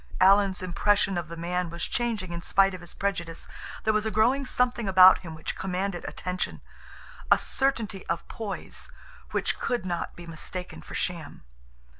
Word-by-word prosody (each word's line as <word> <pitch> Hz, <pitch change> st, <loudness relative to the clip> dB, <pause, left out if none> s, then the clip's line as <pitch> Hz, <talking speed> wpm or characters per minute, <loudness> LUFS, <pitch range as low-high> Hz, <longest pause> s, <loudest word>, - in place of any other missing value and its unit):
Alan's 195 Hz, 0 st, +5 dB
impression 195 Hz, +2 st, +2 dB
of 175 Hz, -2 st, -2 dB
the 170 Hz, +1 st, -8 dB
man 175 Hz, +1 st, -1 dB
was 170 Hz, +1 st, -4 dB
changing 225 Hz, -7 st, -2 dB
in 170 Hz, -, -4 dB
spite 195 Hz, +2 st, +3 dB
of 185 Hz, -, -7 dB
his 175 Hz, -, -8 dB
prejudice. 170 Hz, -5 st, -3 dB, 0.4 s
There 215 Hz, -, +3 dB
was 215 Hz, 0 st, +2 dB
a 220 Hz, -, 0 dB
growing 245 Hz, +6 st, +2 dB
something 245 Hz, -4 st, +1 dB
about 185 Hz, -1 st, +8 dB
him 165 Hz, -3 st, -8 dB
which 160 Hz, -, -4 dB
commanded 190 Hz, -1 st, -2 dB
attention, 180 Hz, 0 st, -3 dB, 0.7 s
a -, -, +9 dB
certainty 230 Hz, -8 st, -1 dB
of 170 Hz, 0 st, -2 dB
poise 205 Hz, -4 st, -5 dB, 0.4 s
which -, -, -1 dB
could 240 Hz, -6 st, -1 dB
not 175 Hz, -2 st, -3 dB
be 175 Hz, -, -10 dB
mistaken 170 Hz, +2 st, -6 dB
for -, -, -9 dB
sham. 170 Hz, -, -3 dB
185 Hz, 165 wpm, -27 LUFS, 175-210 Hz, 0.7 s, a